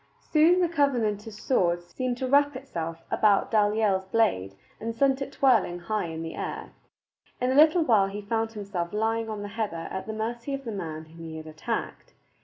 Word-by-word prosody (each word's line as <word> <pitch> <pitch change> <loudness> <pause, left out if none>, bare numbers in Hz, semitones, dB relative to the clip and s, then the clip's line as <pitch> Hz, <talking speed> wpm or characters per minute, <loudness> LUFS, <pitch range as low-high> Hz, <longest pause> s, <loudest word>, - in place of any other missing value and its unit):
Soon 330 +4 +5
the 350 - +3
Covenanter's 225 -9 0
sword 175 -8 +1
seemed 250 +7 -3
to 260 - -2
wrap 285 +1 +4
itself 165 -11 -5
about 205 -2 +3
Dalyell's 210 -3 +2
blade 95 - +1 0.2
and 225 +1 -4
sent 270 +2 +2
it 275 - -4
twirling 240 -11 +3
high 180 +3 -2
in 165 -1 -5
the 165 - -5
air. - - -5 0.7
In 250 +1 +1
a - - +1
little 315 +3 +6
while 215 -9 +4
he 205 +1 -6
found 225 +2 -1
himself 195 -5 -4
lying 225 +1 0
on 210 -1 -4
the 205 - -5
heather 200 -6 -3
at 190 - -5
the 220 - -3
mercy 235 +5 -3
of 275 - -8
the 230 - -3
man 160 -6 -5
whom 165 +1 -12
he 160 - -7
had 160 - -8
attacked. 155 0 -5
215 Hz, 195 wpm, -27 LUFS, 175-255 Hz, 0.7 s, little